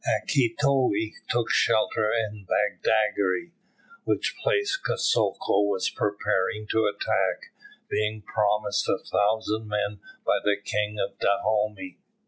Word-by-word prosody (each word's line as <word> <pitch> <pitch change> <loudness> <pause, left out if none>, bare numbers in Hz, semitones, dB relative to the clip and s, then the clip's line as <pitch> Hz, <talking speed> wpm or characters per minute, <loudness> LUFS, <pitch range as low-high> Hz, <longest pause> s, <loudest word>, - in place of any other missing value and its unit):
Akitoye 125 -4 +1 0.2
took 120 -1 0
shelter 110 0 +2
in 105 -4 -2
Badagry, 105 - +1 0.5
which - - -1
place 435 -3 +1
Kosoko 195 - +1
was 100 -2 0
preparing 105 0 -1
to 110 - +2
attack, 475 +9 -1 0.3
being 105 0 -1
promised 105 0 0
a - - +2
thousand 110 +1 0
men 105 0 -2 0.3
by - - +3
the 105 -1 +2
King 105 +1 -2
of - - -3
Dahomey. 110 +2 0
105 Hz, 110 wpm, -26 LUFS, 105-115 Hz, 0.5 s, by